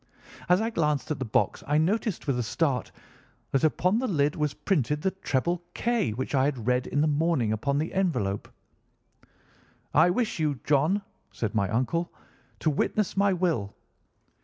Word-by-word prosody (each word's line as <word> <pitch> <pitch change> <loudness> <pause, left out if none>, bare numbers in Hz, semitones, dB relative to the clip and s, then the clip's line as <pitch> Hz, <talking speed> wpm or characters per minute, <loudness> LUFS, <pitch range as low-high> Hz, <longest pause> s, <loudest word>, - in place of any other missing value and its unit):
As 180 +3 +5
I 225 +1 -1
glanced 150 - 0
at 150 - -2
the 130 - -2
box 110 - 0
I 145 +2 +2
noticed, 200 +5 0
with 135 -4 0
a - - +2
start, 130 +3 -1 0.6
that 135 - +1
upon 180 +7 +2
the 260 - -1
lid 150 -7 +1
was 150 -2 -1
printed 150 - 0
the 190 - +2
treble 175 -1 -1
K 235 - +1
which 125 +6 -4
I 135 -1 +3
had 130 -6 -2
read 125 +1 +1
in 145 - 0
the 155 - +3
morning 150 -6 +1
upon 140 +6 -1
the 155 +3 -2
envelope. 160 - -1 1.4
"'I 160 +5 +6
wish 215 0 -1
you, 150 -4 0
John,' 155 +8 +2 0.3
said 110 -4 -3
my 100 -3 +1
uncle, 130 +9 0 0.5
'to 155 - +1
witness 205 +7 0
my 200 0 +3
will. 170 - -1
150 Hz, 170 wpm, -27 LUFS, 130-180 Hz, 1.4 s, I